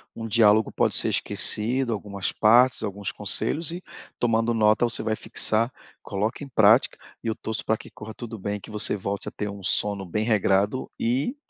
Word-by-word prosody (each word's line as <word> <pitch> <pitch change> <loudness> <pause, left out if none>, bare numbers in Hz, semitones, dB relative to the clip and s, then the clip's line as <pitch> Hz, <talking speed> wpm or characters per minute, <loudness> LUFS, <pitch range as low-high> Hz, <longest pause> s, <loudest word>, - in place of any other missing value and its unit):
um 115 - -6
diálogo 110 -1 +4
pode - - +1
ser - - +2
esquecido, 120 +3 0
algumas 100 -2 -3
partes, 120 +4 +4
alguns 100 -2 -4
conselhos 165 +1 -2
e 180 +2 -7 0.3
tomando 115 0 +1
nota 110 +1 +3
você 115 -1 0
vai 110 0 -1
fixar. 115 +1 +2 0.3
Coloca 105 +8 -3
em - - -8
prática 110 -1 +4 0.3
e - - -5
eu 110 - -1
torço 110 0 -4
pra 110 - +2
que - - -13
corra 110 +1 -10
tudo 115 -3 -8
bem, 100 +1 -3
que 110 - -12
você 105 0 +1
volte 100 0 -4
a - - -4
ter 105 -1 -4
um 100 0 -8
sono 100 0 0
bem 105 +5 -2
regrado 105 +1 +1
e, 130 - -1
110 Hz, 190 wpm, -25 LUFS, 105-120 Hz, 0.3 s, diálogo